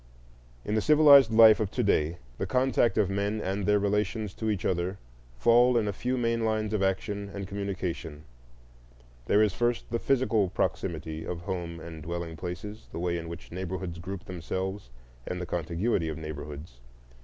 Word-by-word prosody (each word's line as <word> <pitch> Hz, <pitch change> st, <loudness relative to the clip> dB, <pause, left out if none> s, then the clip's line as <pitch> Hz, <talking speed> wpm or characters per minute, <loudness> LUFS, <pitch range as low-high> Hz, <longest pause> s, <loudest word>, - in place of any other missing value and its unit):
In 105 Hz, -, -2 dB
the 110 Hz, -, +2 dB
civilized 145 Hz, -2 st, +7 dB
life 110 Hz, -1 st, +7 dB
of 105 Hz, -3 st, 0 dB
to -, -, -1 dB
day 80 Hz, +3 st, +1 dB, 0.2 s
the 95 Hz, -, -1 dB
contact 125 Hz, 0 st, +2 dB
of 105 Hz, -3 st, +3 dB
men 100 Hz, +2 st, -1 dB
and 100 Hz, 0 st, -2 dB
their 105 Hz, 0 st, +4 dB
relations 105 Hz, 0 st, -1 dB
to 110 Hz, -, -3 dB
each 105 Hz, -3 st, -2 dB
other 90 Hz, +1 st, -1 dB, 0.4 s
fall 120 Hz, -, +5 dB
in 110 Hz, -2 st, +1 dB
a 100 Hz, -, -1 dB
few 125 Hz, +6 st, -2 dB
main 115 Hz, -1 st, 0 dB
lines 110 Hz, -1 st, 0 dB
of 105 Hz, -, 0 dB
action 100 Hz, +1 st, -1 dB
and 100 Hz, -1 st, -6 dB
communication: 95 Hz, -6 st, -4 dB, 1.0 s
there 105 Hz, -, +5 dB
is, 105 Hz, -3 st, +1 dB
first, 120 Hz, 0 st, 0 dB
the 115 Hz, -, 0 dB
physical 115 Hz, -8 st, +2 dB
proximity 80 Hz, -2 st, -2 dB
of 85 Hz, 0 st, -5 dB
home 85 Hz, -2 st, -4 dB
and 80 Hz, -1 st, -9 dB
dwelling 85 Hz, +1 st, -5 dB
places, 95 Hz, +6 st, -7 dB
the -, -, -7 dB
way 85 Hz, 0 st, -1 dB
in 85 Hz, -1 st, -5 dB
which 85 Hz, 0 st, -9 dB
neighborhoods 90 Hz, -1 st, -5 dB
group 90 Hz, +2 st, -6 dB
themselves, 95 Hz, 0 st, -4 dB, 0.4 s
and 90 Hz, -, -3 dB
the 90 Hz, -, -4 dB
contiguity 85 Hz, +2 st, -1 dB
of 80 Hz, -, -4 dB
neighborhoods. 75 Hz, -3 st, -8 dB
95 Hz, 175 wpm, -28 LUFS, 85-110 Hz, 1.0 s, civilized